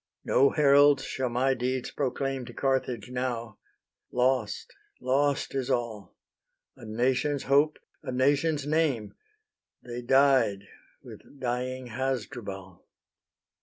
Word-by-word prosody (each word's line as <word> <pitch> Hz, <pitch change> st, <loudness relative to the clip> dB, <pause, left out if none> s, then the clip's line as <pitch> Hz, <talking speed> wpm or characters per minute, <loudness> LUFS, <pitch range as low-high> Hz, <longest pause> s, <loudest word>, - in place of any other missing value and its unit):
No 140 Hz, +1 st, +4 dB
heralds 145 Hz, -1 st, +5 dB
shall 130 Hz, -1 st, -2 dB
my 130 Hz, +3 st, +1 dB
deeds 130 Hz, 0 st, -2 dB
proclaim 135 Hz, -1 st, -2 dB
To 120 Hz, -, -10 dB
Carthage 125 Hz, -4 st, -1 dB
now: 120 Hz, -4 st, -3 dB, 0.5 s
lost, 125 Hz, -3 st, 0 dB, 0.3 s
lost 140 Hz, +2 st, 0 dB
is 135 Hz, -2 st, -2 dB
all: 110 Hz, -6 st, -3 dB, 0.6 s
A -, -, -13 dB
nation's 130 Hz, +5 st, 0 dB
hope, 145 Hz, +3 st, +3 dB, 0.2 s
a -, -, -5 dB
nation's 140 Hz, +3 st, +1 dB
name, 145 Hz, -9 st, 0 dB, 0.7 s
They 120 Hz, 0 st, -6 dB
died 130 Hz, -6 st, +3 dB, 0.4 s
with 140 Hz, -, -14 dB
dying 125 Hz, 0 st, -3 dB
Hasdrubal." 110 Hz, -7 st, -5 dB
130 Hz, 105 wpm, -28 LUFS, 120-140 Hz, 0.7 s, heralds